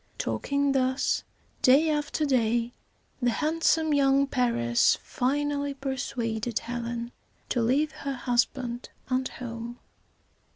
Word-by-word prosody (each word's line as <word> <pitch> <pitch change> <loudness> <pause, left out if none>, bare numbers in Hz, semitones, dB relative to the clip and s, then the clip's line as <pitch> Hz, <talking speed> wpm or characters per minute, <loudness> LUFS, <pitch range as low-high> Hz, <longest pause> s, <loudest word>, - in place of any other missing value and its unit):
Talking 280 0 0
thus 260 0 +1 0.4
day 275 +5 +6
after 300 +1 -1
day, 235 -3 +1 0.5
the 245 - +3
handsome 315 +3 +2
young 275 -1 +4
Paris 235 - +2
finally 285 +2 -1
persuaded 240 -4 -3
Helen 235 0 -4 0.4
to 245 - +1
leave 275 +7 +2
her 275 -3 -5
husband 245 0 -1 0.2
and 255 0 +1
home. 235 -1 -7
255 Hz, 100 wpm, -27 LUFS, 240-280 Hz, 0.5 s, day